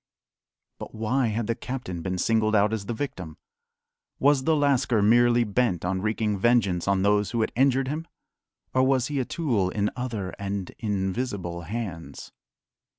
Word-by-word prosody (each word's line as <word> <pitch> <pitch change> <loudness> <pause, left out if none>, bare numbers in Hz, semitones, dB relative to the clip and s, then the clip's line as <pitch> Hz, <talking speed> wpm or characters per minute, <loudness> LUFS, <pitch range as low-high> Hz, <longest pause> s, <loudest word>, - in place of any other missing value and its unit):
But - - -9
why 115 +4 0
had 110 +1 -1
the 115 - 0
captain 115 -9 -5
been 95 +1 -3
singled 110 +2 +2
out 105 +1 +3
as 100 -3 -4
the - - -2
victim? 90 - -5 0.8
Was 140 -1 +3
the 160 0 +3
lascar 140 -6 +2
merely 120 +2 +5
bent 105 -5 0
on 95 +1 -1
wreaking 105 -1 -1
vengeance 100 -6 +2
on 100 -1 +2
those 105 0 +2
who 115 -2 -1
had 110 - 0
injured 135 +1 +3
him? 155 +4 -4 0.7
Or 130 - +3
was 130 -1 +2
he 145 -2 -1
a 130 - 0
tool 120 - 0
in 105 +1 -1
other 115 -7 -4
and 100 -2 -4
invisible 95 -3 -2
hands? 100 -8 -6
110 Hz, 160 wpm, -26 LUFS, 100-125 Hz, 0.8 s, merely